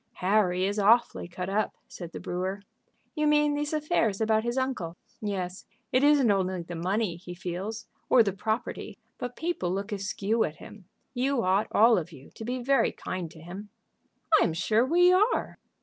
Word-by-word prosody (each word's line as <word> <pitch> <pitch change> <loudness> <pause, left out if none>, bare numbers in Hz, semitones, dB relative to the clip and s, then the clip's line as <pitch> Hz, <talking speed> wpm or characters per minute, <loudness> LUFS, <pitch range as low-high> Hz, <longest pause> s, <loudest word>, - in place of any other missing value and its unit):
"Harry 185 -1 +2
is 205 +2 -1
awfully 225 -1 +3
cut 180 +1 -5
up," 205 +2 -1
said 170 -2 -9
the - - -7
brewer. 185 +3 -3 0.5
"You 305 -1 0
mean 295 0 +3
these 295 0 -2
affairs 305 - 0
about 220 0 +2
his 240 +2 -2
uncle?" 230 -11 -2 0.2
"Yes. 190 -3 -4 0.2
It 255 +2 +3
isn't 285 -6 +5
only 185 -2 0
the 175 - -8
money 180 +2 -1
he 175 0 -9
feels, 185 +5 -5 0.2
or 240 - +7
the 200 -3 -1
property, 220 +4 -3 0.2
but 245 0 -5
people 325 - -2
look 200 +3 -3
askew 205 +2 0
at 155 - -3
him. 200 +5 -13 0.3
You 260 -1 0
ought 190 +3 +2
all 225 -1 +5
of 175 +1 -7
you 140 -4 -14
to - - -9
be 250 +2 -3
very 275 +2 +3
kind 185 -3 -5
to 160 -1 -14
him." 190 +5 -9 0.7
"I - - +5
am 165 - -1
sure 215 +7 +2
we 355 +4 +5
are." 415 +6 +1
210 Hz, 180 wpm, -28 LUFS, 185-245 Hz, 0.7 s, or